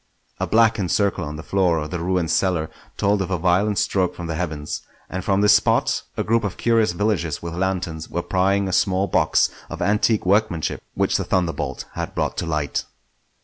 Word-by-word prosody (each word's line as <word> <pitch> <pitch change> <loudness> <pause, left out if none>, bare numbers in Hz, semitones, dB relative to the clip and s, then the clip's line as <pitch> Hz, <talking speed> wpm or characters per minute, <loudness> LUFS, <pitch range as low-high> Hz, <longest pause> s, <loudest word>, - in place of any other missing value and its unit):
A - - -1
blackened 110 -4 +3
circle 100 -3 +1
on 75 +1 -5
the 80 - -7
floor 90 -4 +2
of 75 -1 -4
the 85 - -3
ruined 90 -1 0
cellar 90 -5 +1 0.3
told 100 0 +2
of 95 - -2
a 90 - 0
violent 95 +4 +2
stroke 95 -2 +1
from 90 - -6
the 80 - -3
heavens; 80 -3 -4 0.3
and 95 0 -3
from 100 0 +2
this 105 - +6
spot - - +2 0.2
a - - 0
group 115 +1 +1
of 100 -3 -3
curious 115 -5 +2
villagers 85 -6 -1
with 85 -1 -5
lanterns 90 -3 -2
were 85 - -2
prying 95 +1 +1
a 95 - -3
small 95 +1 +2
box - - +2 0.2
of - - -6
antique 105 +3 +2
workmanship 95 -4 +1
which - - +1
the - - -2
thunderbolt 90 -3 -1
had - - -5
brought - - -1
to - - -2
light. 75 -3 -1
95 Hz, 195 wpm, -22 LUFS, 85-100 Hz, 0.3 s, this